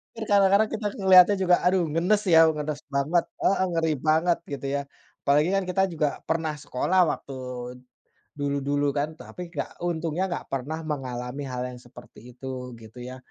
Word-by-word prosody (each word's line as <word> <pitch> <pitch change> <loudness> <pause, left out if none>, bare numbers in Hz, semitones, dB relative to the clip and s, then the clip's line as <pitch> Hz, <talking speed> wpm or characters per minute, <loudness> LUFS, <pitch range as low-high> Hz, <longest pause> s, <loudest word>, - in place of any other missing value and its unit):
Kan 225 -1 -5
kadang-kadang 200 +2 +5
kita 220 -1 -4 0.2
melihatnya 185 +1 +8
juga 180 -1 +5
aduh 180 0 +3
ngenes 180 +7 +2
ya, 160 - +8 0.2
ngenes 150 0 -4
banget 155 +5 +2 0.2
heeh 195 -1 +3
ngeri 165 -1 +1
banget 165 +2 +3
gitu 140 0 -5
ya? 140 - 0 0.4
Apalagi 150 +4 +3
kan 195 - +1
kita 180 +1 +1
juga 155 -2 +1 0.2
pernah 160 -1 0
sekolah 185 +9 0
waktu 140 - -7 1.1
dulu-dulu 145 0 0
kan, 145 +2 0
tapi 180 -1 -8
enggak, - - -4
untungnya 170 +1 -1
enggak 175 - -4
pernah 140 +4 -3
mengalami 130 -2 -4
hal 125 0 -3
yang 125 -1 -10
seperti 120 0 -15 0.2
itu 125 -1 -6
gitu 110 +3 -13
ya. 130 - -8
155 Hz, 160 wpm, -26 LUFS, 140-180 Hz, 1.1 s, melihatnya